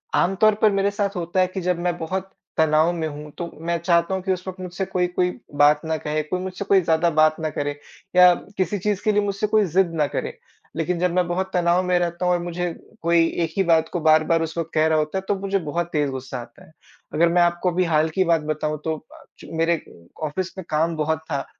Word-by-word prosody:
आम 195 Hz, +2 st, +2 dB
तौर 215 Hz, -1 st, +6 dB
पर 215 Hz, -2 st, +5 dB
मेरे 200 Hz, +1 st, +1 dB
साथ 200 Hz, -1 st, -2 dB
होता 175 Hz, +1 st, -2 dB
है 185 Hz, -, +3 dB
कि 185 Hz, 0 st, -5 dB
जब 180 Hz, -1 st, 0 dB
मैं 175 Hz, 0 st, -1 dB
बहुत 190 Hz, +4 st, -4 dB, 0.3 s
तनाव 160 Hz, +1 st, +4 dB
में 160 Hz, -2 st, -2 dB
हूँ, 150 Hz, 0 st, -8 dB
तो 170 Hz, -1 st, -5 dB
मैं 170 Hz, +1 st, -1 dB
चाहता 170 Hz, +2 st, +2 dB
हूँ 190 Hz, -, -3 dB
कि 190 Hz, -, 0 dB
उस 185 Hz, +1 st, -7 dB
वक़्त 185 Hz, 0 st, -6 dB
मुझसे 180 Hz, +1 st, -4 dB
कोई 180 Hz, -1 st, 0 dB
कोई 180 Hz, 0 st, 0 dB, 0.2 s
बात 145 Hz, +1 st, +5 dB
ना 160 Hz, 0 st, -1 dB
कहे, 155 Hz, +1 st, -2 dB
कोई 180 Hz, +4 st, -3 dB
मुझसे 190 Hz, +1 st, -5 dB
कोई 195 Hz, -1 st, +4 dB
ज़्यादा 165 Hz, +1 st, +2 dB
बात 155 Hz, 0 st, +4 dB
ना 155 Hz, -1 st, -1 dB
करे 145 Hz, 0 st, -3 dB, 0.4 s
या 180 Hz, -1 st, +8 dB, 0.2 s
किसी 185 Hz, +2 st, 0 dB
चीज़ 205 Hz, 0 st, -1 dB
के 215 Hz, -, +3 dB
लिए 210 Hz, 0 st, +2 dB
मुझसे 200 Hz, +1 st, -1 dB
कोई 215 Hz, -1 st, +3 dB
ज़िद 175 Hz, 0 st, +1 dB
ना 150 Hz, -2 st, +2 dB
करे। 475 Hz, -, -4 dB, 0.4 s
लेकिन 170 Hz, +2 st, -1 dB
जब 180 Hz, -1 st, +1 dB
मैं 180 Hz, -1 st, +2 dB
बहुत 190 Hz, +2 st, -2 dB
तनाव 175 Hz, +1 st, +2 dB
में 180 Hz, -1 st, +2 dB
रहता 175 Hz, +1 st, -2 dB
हूँ 180 Hz, -, +3 dB
और 175 Hz, -, +1 dB
मुझे 175 Hz, 0 st, -3 dB, 0.3 s
कोई 170 Hz, 0 st, +3 dB, 0.2 s
एक 160 Hz, -, -3 dB
ही 195 Hz, -, +4 dB
बात 165 Hz, -2 st, +3 dB
को 175 Hz, -, 0 dB
बार-बार 155 Hz, +1 st, +4 dB
उस 165 Hz, +1 st, -6 dB
वक़्त 165 Hz, 0 st, -3 dB
कह 155 Hz, 0 st, +3 dB
रहा 160 Hz, -1 st, +2 dB
होता 155 Hz, +5 st, -2 dB
है, -, -, -1 dB
तो 205 Hz, -, +3 dB
मुझे 195 Hz, 0 st, 0 dB
बहुत 170 Hz, +2 st, -2 dB
तेज़ 145 Hz, -2 st, +1 dB
गुस्सा 130 Hz, -1 st, -6 dB
आता -, -, -15 dB
है। -, -, -21 dB, 0.4 s
अगर 170 Hz, +3 st, +4 dB
मैं 175 Hz, +1 st, +3 dB
आपको 175 Hz, +1 st, +2 dB
अभी 180 Hz, +2 st, +1 dB
हाल 160 Hz, -1 st, +2 dB
की 190 Hz, -, +5 dB
बात 165 Hz, -2 st, +3 dB
बताऊँ, 155 Hz, 0 st, -2 dB
तो 160 Hz, 0 st, 0 dB, 0.2 s
अ, -, -, -15 dB, 0.3 s
मेरे 165 Hz, +1 st, +2 dB
अ, 85 Hz, -, -13 dB
ऑफ़िस 185 Hz, +5 st, -3 dB
का 190 Hz, -, -8 dB
काम 160 Hz, +2 st, +1 dB
बहुत 155 Hz, 0 st, 0 dB
था 140 Hz, -1 st, -1 dB
170 Hz, 250 wpm, -23 LUFS, 160-185 Hz, 0.4 s, या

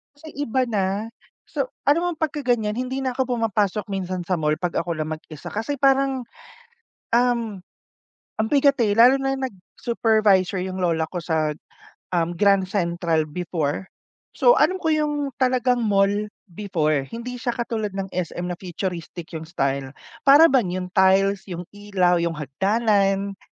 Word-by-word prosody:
Kasi 315 Hz, +2 st, -12 dB, 0.2 s
iba 260 Hz, +2 st, 0 dB
na. 200 Hz, +1 st, -1 dB, 0.4 s
So, -, -, -2 dB, 0.2 s
alam 335 Hz, +4 st, +3 dB
mo -, -, +1 dB
pagka 300 Hz, -2 st, -3 dB
ganyan 220 Hz, -3 st, +1 dB
hindi 255 Hz, +2 st, -2 dB
na 260 Hz, -, 0 dB
ako 255 Hz, -2 st, 0 dB
pumapasok 210 Hz, -2 st, 0 dB
minsan 185 Hz, -2 st, -3 dB
sa 180 Hz, +1 st, -1 dB
mall 150 Hz, 0 st, +1 dB
'pag 175 Hz, +1 st, -3 dB
ako 170 Hz, 0 st, -2 dB
lang 155 Hz, 0 st, -3 dB
mag-isa 155 Hz, -1 st, -8 dB
kasi 225 Hz, +7 st, -2 dB
parang, 270 Hz, -1 st, +2 dB, 0.9 s
um, 235 Hz, -4 st, +1 dB, 0.8 s
ang 220 Hz, 0 st, 0 dB
bigat, 280 Hz, -1 st, +4 dB
eh. 205 Hz, -, +2 dB
Lalo 245 Hz, +4 st, +7 dB
na 270 Hz, 0 st, 0 dB
nag 265 Hz, -2 st, -3 dB, 0.3 s
supervisor 215 Hz, -5 st, +2 dB
yung 185 Hz, 0 st, -4 dB
lola 165 Hz, -3 st, 0 dB
ko 180 Hz, -, -5 dB
sa, 160 Hz, -2 st, 0 dB, 0.6 s
um, 170 Hz, -1 st, 0 dB
Grand 195 Hz, -1 st, +3 dB
Central 170 Hz, -4 st, 0 dB
before. 165 Hz, 0 st, -2 dB, 0.5 s
So, -, -, +5 dB
alam 370 Hz, 0 st, +2 dB
ko 320 Hz, -, +1 dB
yung 295 Hz, -2 st, 0 dB
talagang 255 Hz, -1 st, +2 dB
mall 195 Hz, -1 st, +3 dB, 0.4 s
before, 155 Hz, -7 st, -1 dB
hindi 240 Hz, -, -7 dB
siya 245 Hz, 0 st, -2 dB
katulad 225 Hz, -4 st, -3 dB
ng 195 Hz, -1 st, -4 dB
SM 180 Hz, 0 st, -3 dB
na 175 Hz, -, -4 dB
futuristic 175 Hz, -2 st, -6 dB
yung 160 Hz, -1 st, -6 dB
style. 140 Hz, -4 st, -2 dB, 0.3 s
Para 290 Hz, +4 st, +8 dB
bang 235 Hz, -10 st, +2 dB
yung 185 Hz, 0 st, -3 dB
tiles, 190 Hz, +1 st, +3 dB
yung 175 Hz, -3 st, -5 dB
ilaw, 195 Hz, -4 st, +1 dB
yung 170 Hz, -1 st, -1 dB
hagdanan. 195 Hz, -, 0 dB
200 Hz, 155 wpm, -23 LUFS, 175-245 Hz, 0.9 s, Para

